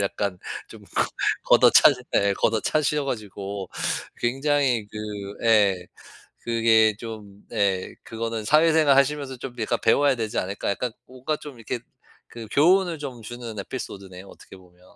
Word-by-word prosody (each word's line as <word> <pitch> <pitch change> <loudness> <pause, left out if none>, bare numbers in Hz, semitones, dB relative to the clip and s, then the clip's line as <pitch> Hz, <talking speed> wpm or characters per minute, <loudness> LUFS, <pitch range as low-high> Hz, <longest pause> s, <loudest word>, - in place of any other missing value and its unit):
약간 100 -1 -2 0.3
좀 - - -13
거 - - 0 0.4
걷어차셔 135 -4 +6
네 100 0 +3
걷어차셔 145 +8 +1
가지고 100 -5 -5 0.5
굉장히 135 -2 +1
그 105 - -12 0.5
예 100 -5 +3 0.5
그게 115 -2 +3
좀 105 -4 -9
네 100 -4 0
그거는 115 -1 -4
'사회생활 155 0 +5
하시면서 140 -1 +1
좀 125 0 -8
약간 110 - 0
배워야 145 -1 +4
되지 110 -3 -3
않을까.' 100 +2 -2
약간 125 +5 -2 0.2
뭔가 130 +4 -3
좀 145 -4 -11
이렇게 115 +1 -4 0.5
그 115 -1 -9
교훈을 175 - +3
좀 130 -5 -7
주는 115 -1 -8
에피소드네요 95 -4 -7
어떻게 95 - -14
보면. 90 -1 -21
115 Hz, 295 characters per minute, -24 LUFS, 100-135 Hz, 0.5 s, 걷어차셔